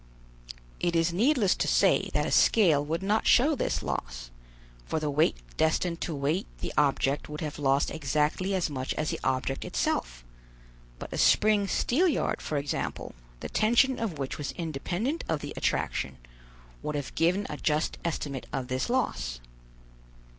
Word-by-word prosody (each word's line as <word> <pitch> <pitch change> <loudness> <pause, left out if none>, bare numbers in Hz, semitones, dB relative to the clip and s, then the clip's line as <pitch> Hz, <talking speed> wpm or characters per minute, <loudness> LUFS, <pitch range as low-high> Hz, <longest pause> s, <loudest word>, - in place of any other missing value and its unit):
It 175 -1 0
is 165 +1 +2
needless 225 - +3
to - - 0
say - - +3
that - - +2
a - - -2
scale 165 -10 +4
would 165 +5 -3
not 210 +3 +1
show 280 +6 +5
this 275 - -1
loss; - - -4 0.5
for 160 - -2
the 150 -1 -2
weight 145 - +2 0.2
destined 165 +2 +1
to 165 - -2
weight 145 +7 -1
the - - -5
object 140 -1 +1
would 150 0 -6
have 150 -2 -4
lost 140 0 +2
exactly 155 +6 0
as 185 - +1
much 130 -3 -3
as 155 - -1
the - - -4
object 130 +1 -1
itself; - - -2 0.7
but - - -8
a - - -3
spring 210 -1 +4
steelyard 305 - +1
for 150 - -2
example, 140 0 -3 0.3
the - - -5
tension 240 +4 +3
of 205 -9 -3
which 135 +1 -4
was 145 - -4
independent 175 - -3
of 155 -2 0
the - - -6
attraction, 65 -1 -1 0.6
would 150 - -3
have 145 -2 -4
given 180 +5 +1
a 150 - -5
just 150 +1 0
estimate 145 -5 -3
of 130 -1 -3
this 130 - -1
loss. 65 - -1
155 Hz, 160 wpm, -28 LUFS, 140-195 Hz, 0.7 s, show